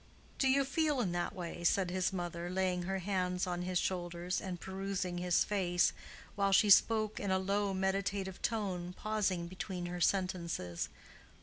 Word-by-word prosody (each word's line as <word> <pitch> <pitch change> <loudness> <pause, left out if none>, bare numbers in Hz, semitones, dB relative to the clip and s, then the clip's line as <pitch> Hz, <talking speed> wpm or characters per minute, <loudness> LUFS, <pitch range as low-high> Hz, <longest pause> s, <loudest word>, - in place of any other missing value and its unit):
"Do 270 - +3
you 275 +1 +4
feel 295 0 +1
in 200 -7 0
that 175 0 -2
way?" 175 -1 -6
said 180 +1 +2
his 185 0 +1
mother, 175 -2 -4
laying 185 -1 0
her 195 +2 -2
hands 180 -1 -1
on 175 -1 -2
his 180 0 -1
shoulders, 175 0 -2
and 180 -2 -5
perusing 190 -1 -3
his 180 -1 +3
face, 180 -4 +2 0.4
while 200 -1 +1
she 205 +1 +5
spoke 215 +1 +5
in 200 - -2
a 190 - +3
low 200 +1 0
meditative 190 0 -1
tone, 185 -6 -2
pausing 200 -5 0
between 185 0 -5
her 175 0 -4
sentences. 170 - 0
185 Hz, 165 wpm, -34 LUFS, 175-200 Hz, 0.4 s, she